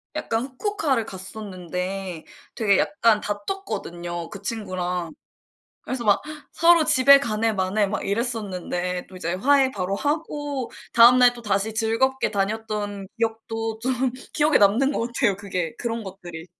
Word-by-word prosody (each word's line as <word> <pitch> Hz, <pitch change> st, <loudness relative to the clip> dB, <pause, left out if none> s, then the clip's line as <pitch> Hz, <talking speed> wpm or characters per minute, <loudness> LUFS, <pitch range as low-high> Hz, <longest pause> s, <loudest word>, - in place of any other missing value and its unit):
약간 225 Hz, +1 st, -1 dB
후쿠오카를 275 Hz, -, -1 dB
갔었는데 185 Hz, -2 st, -6 dB, 0.3 s
되게 210 Hz, -4 st, +3 dB
약간 210 Hz, +2 st, +3 dB
다퉜거든요 175 Hz, -, -5 dB
그 200 Hz, -1 st, -10 dB
친구랑. 180 Hz, -6 st, -3 dB, 0.7 s
그래서 255 Hz, -2 st, -4 dB
막 205 Hz, -2 st, +4 dB, 0.3 s
서로 335 Hz, -1 st, +5 dB
집에 280 Hz, -2 st, +7 dB
가네 225 Hz, -3 st, 0 dB
마네 195 Hz, +2 st, +1 dB
막 200 Hz, -, -3 dB
이랬었는데 195 Hz, -5 st, -2 dB
또 185 Hz, -, -12 dB
이제 170 Hz, -1 st, -3 dB
화해 265 Hz, +5 st, +3 dB
바로 195 Hz, -1 st, -2 dB
하고 290 Hz, -2 st, -2 dB, 0.2 s
다음날 245 Hz, +1 st, +7 dB
또다시 215 Hz, -2 st, -2 dB
즐겁게 230 Hz, +5 st, +1 dB
다녔던 205 Hz, -1 st, -3 dB
기억도 225 Hz, 0 st, -2 dB
좀 255 Hz, +1 st, 0 dB, 0.2 s
기억에 300 Hz, 0 st, +4 dB
남는 230 Hz, +8 st, +4 dB
것 230 Hz, -, -1 dB
같아요 235 Hz, -4 st, +1 dB
그게 185 Hz, -5 st, -3 dB
그런 230 Hz, -2 st, -3 dB
것들이. 175 Hz, -4 st, -9 dB
220 Hz, 300 characters per minute, -24 LUFS, 190-250 Hz, 0.7 s, 집에